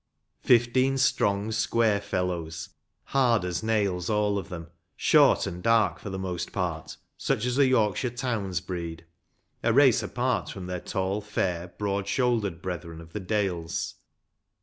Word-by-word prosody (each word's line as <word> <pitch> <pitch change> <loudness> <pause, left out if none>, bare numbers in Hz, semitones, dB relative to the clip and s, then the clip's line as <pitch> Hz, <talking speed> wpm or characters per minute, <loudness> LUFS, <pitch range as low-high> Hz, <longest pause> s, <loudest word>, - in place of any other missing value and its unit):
Fifteen 130 +3 +3
strong, 100 -4 +1
square 110 -1 +2
fellows, 90 -5 -3 0.3
hard 120 -7 +2
as 90 -1 -2
nails 100 -5 0
all 105 -1 +1
of - - -8
them; 85 -2 -8 0.2
short - - +5
and 90 +1 -5
dark 115 0 +3
for - - -7
the 95 - -4
most 90 -2 -4
part, 85 -5 -3 0.2
such 110 - 0
as 125 0 0
the 140 -1 +5
Yorkshire 120 -1 +2
towns 115 -7 -2
breed 85 -3 -6 0.6
‚ÄĒ 115 - +2
a - - +3
race 135 -2 +6
apart 125 -1 -1
from 95 -2 -7
their 90 0 -3
tall, 95 +1 -2
fair, 90 -4 -2
broad 100 -1 -1
shouldered 105 -6 0
brethren 85 -3 -5
of 80 0 -13
the 105 - -3
dales. 95 -4 -2
100 Hz, 150 wpm, -27 LUFS, 90-115 Hz, 0.6 s, race